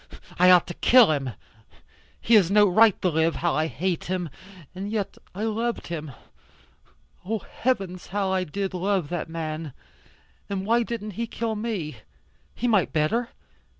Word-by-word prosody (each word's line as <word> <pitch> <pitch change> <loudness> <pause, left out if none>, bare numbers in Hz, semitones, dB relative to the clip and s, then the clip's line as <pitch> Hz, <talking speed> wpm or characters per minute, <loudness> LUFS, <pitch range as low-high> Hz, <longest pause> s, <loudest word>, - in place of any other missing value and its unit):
I 180 +1 +7
ought 180 -2 +7
to 175 - -6
kill 245 -4 +6
him. 140 -3 -1 0.9
He 235 - 0
has 200 -6 +6
no 205 +1 +5
right 215 +2 +5
to 185 - +3
live. 160 0 +1
How 170 -1 0
I 155 +1 +1
hate 170 +6 -2
him. 180 -2 -2 0.4
And 195 +2 -5
yet 210 -3 -2 0.2
I 205 - -3
loved 225 +2 -2
him. 155 -3 -5 1.1
Oh 220 +5 -2
heavens, 195 -5 -3
how 195 -1 -1
I 190 -1 +1
did 195 +4 -4
love 185 -3 0
that 175 -2 -3
man. 155 -3 -5 0.8
And 195 -1 -3
why 230 +3 +3
didn't 225 -2 -4
he 230 +4 -4
kill 225 0 -3
me? 210 -9 -4 0.6
He 245 - -1
might 210 -6 +2
better. 225 +11 0
190 Hz, 160 wpm, -25 LUFS, 170-220 Hz, 1.1 s, I